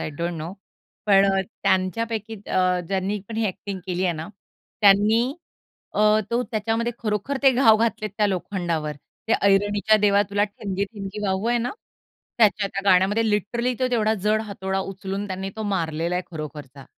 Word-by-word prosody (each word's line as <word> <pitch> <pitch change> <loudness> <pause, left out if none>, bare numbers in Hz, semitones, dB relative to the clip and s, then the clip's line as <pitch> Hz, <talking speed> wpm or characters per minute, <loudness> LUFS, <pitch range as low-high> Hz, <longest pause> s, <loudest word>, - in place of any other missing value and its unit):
I - - -3
don't 170 +1 -1
know, 160 +3 -5 0.5
पण 195 -1 +6
अ, 195 - +2 0.2
त्यांच्यापैकी 215 +3 0
अ, 185 -1 +2
ज्यांनी 195 +2 -1
पण 225 - -6
ही 225 - +1
अ‍ॅक्टिंग 195 0 -5
केली 185 0 -1
आहे 175 - +2
ना, 160 +3 -6 0.5
त्यांनी 210 +2 +5 0.7
अ, - - +1 0.3
तो 240 +1 +1
त्याच्यामध्ये 225 +2 0
खरोखर 215 +5 -2
ते 270 - +7
घाव 240 -4 +6
घातलेत 215 -2 -1
त्या 210 -1 +3
लोखंडावर. 175 -5 -2 0.4
ते - - +3
ऐरणीच्या 205 +2 +3
देवा 205 -1 +4
तुला, 205 0 +2
ठीणगी-ठीणगी 200 0 -5
वाहू 190 +2 -1
आहे 240 0 +2
ना? 240 +1 -2 0.7
त्याच्या 210 -2 +4
त्या 195 - -4
गाण्यामध्ये 200 +5 +3
लिटरली 235 +5 0
तो 255 - +2
तेवढा 220 -2 +2
जड 215 +1 +3
हातोडा 195 -2 -3
उचलून 195 +1 -5
त्यांनी 190 +1 -4
तो 220 - -4
मारलेला 170 -4 -1
आहे 180 - -1
खरोखरचा. 145 -4 -8
200 Hz, 165 wpm, -23 LUFS, 185-220 Hz, 0.7 s, ते